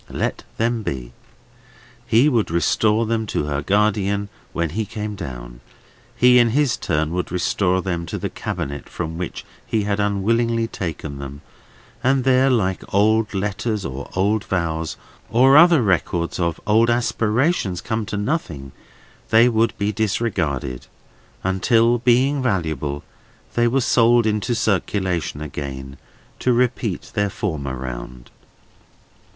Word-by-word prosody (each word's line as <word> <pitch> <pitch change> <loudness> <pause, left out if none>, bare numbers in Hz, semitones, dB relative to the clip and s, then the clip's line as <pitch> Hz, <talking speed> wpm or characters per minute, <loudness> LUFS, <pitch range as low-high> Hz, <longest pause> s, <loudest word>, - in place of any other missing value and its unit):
Let - - -3
them 115 0 0
be. 65 - -5 0.9
He 120 +6 +4
would 120 -7 +1
restore 105 +6 +2
them 110 -1 -1
to - - -1
her 75 -1 -2
guardian 100 +1 +1 0.2
when 85 -2 -2
he 110 +6 -1
came 105 0 -5
down; - - -8 0.6
he 125 0 +6
in 120 -1 +4
his 145 -5 +2
turn 80 -1 -1
would 90 0 -3
restore 90 0 +1
them 85 -3 -3
to - - -4
the - - -3
cabinet 70 +1 -5
from 80 -1 -5
which 90 - -5 0.2
he 110 -2 -1
had 100 0 -1
unwillingly 115 +3 +1
taken 80 -9 -5
them; 70 +1 -8 0.6
and 130 0 +2
there, 130 +1 +4
like 95 -7 +1
old 105 +1 +2
letters 100 +1 -2
or 70 +1 -6
old 100 +3 +1
vows, 80 -4 -2 0.3
or 130 +5 +5
other 170 -3 +7
records 90 -3 0
of 85 -2 -1
old 110 +3 +4
aspirations 120 - +1
come 110 -1 -2
to 105 - -3
nothing, 100 - -3 0.6
they 115 +2 +6
would 115 -1 +1
be 100 +1 0
disregarded, 95 - -2 0.6
until, 115 +6 +3
being 130 +4 +3
valuable, 80 - -1 0.5
they 120 0 +3
were 135 +3 +2
sold 120 -1 +4
into 110 +3 0
circulation 95 -7 -1
again, 70 -2 -6 0.4
to 125 - +2
repeat 120 -5 -1
their 105 0 +1
former 75 -10 -3
round. 60 -1 -7
100 Hz, 135 wpm, -21 LUFS, 85-115 Hz, 0.9 s, other